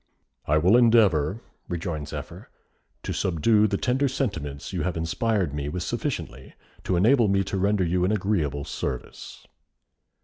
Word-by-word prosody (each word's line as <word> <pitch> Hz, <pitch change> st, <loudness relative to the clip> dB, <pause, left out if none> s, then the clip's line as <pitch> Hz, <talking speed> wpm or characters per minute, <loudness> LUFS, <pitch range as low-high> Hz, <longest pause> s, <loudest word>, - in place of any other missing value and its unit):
"I 75 Hz, -, +3 dB
will 90 Hz, +9 st, +5 dB
endeavour," 110 Hz, -, +3 dB, 0.3 s
rejoined 85 Hz, -4 st, -4 dB
Zephyr, -, -, -8 dB, 0.5 s
"to -, -, -3 dB
subdue 105 Hz, +5 st, +2 dB
the 100 Hz, -1 st, -1 dB
tender 130 Hz, +5 st, +1 dB
sentiments 100 Hz, -, -4 dB
you -, -, -2 dB
have 90 Hz, -2 st, -2 dB
inspired 90 Hz, 0 st, -1 dB
me 75 Hz, 0 st, -3 dB
with 90 Hz, +3 st, -4 dB
sufficiently 65 Hz, -4 st, -4 dB, 0.3 s
to 95 Hz, -, +1 dB
enable 115 Hz, +6 st, +4 dB
me 100 Hz, 0 st, +2 dB
to 95 Hz, -, -3 dB
render 100 Hz, 0 st, +2 dB
you 90 Hz, +1 st, 0 dB
an 95 Hz, -, +2 dB
agreeable 85 Hz, -9 st, -1 dB
service." 65 Hz, -4 st, -6 dB
95 Hz, 145 wpm, -25 LUFS, 75-110 Hz, 0.5 s, will